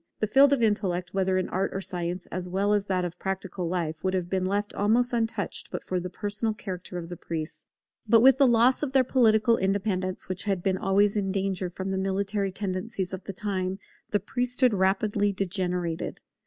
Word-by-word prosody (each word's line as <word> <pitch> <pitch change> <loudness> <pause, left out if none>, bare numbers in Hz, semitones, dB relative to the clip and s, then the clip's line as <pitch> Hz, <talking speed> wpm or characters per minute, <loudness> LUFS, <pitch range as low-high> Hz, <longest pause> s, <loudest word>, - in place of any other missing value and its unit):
The - - 0
field 275 +6 +5
of 270 -4 +2
intellect, 185 -5 0
whether 190 -1 +1
in 185 - 0
art 190 +2 0
or - - -1
science, 180 -1 -3
as 180 0 -4
well 200 +3 +1
as 205 -1 +1
that 185 -2 0
of 175 -1 -6
practical 190 -2 -3
life, 165 -3 -2
would 190 0 +1
have 180 -1 -2
been 190 -1 0
left 205 +1 -1
almost 235 +4 +2
untouched 225 -3 -2
but - - -5
for 185 - -2
the 180 +1 -5
personal 210 +3 -2
character 185 -3 -6
of 170 -1 -5
the 175 - -6
priests. 160 -1 -6 0.4
But 230 -1 +6
with 265 +2 +6
the 275 - +6
loss 240 +2 +4
of 280 -3 -2
their 265 -1 +5
political 230 -3 +4
independence, 190 -1 -1
which 185 +2 -4
had 195 -4 -1
been 190 -1 +1
always 200 +2 +3
in 195 -2 0
danger 190 -2 -1
from 190 +2 -5
the 190 - -1
military 195 +1 -1
tendencies 190 0 -3
of 190 0 -6
the 195 - -5
time, 190 -1 -2 0.3
the 205 - +1
priesthood 245 +3 +1
rapidly 205 +2 +2
degenerated. 180 -3 -2
195 Hz, 200 wpm, -27 LUFS, 185-210 Hz, 0.4 s, But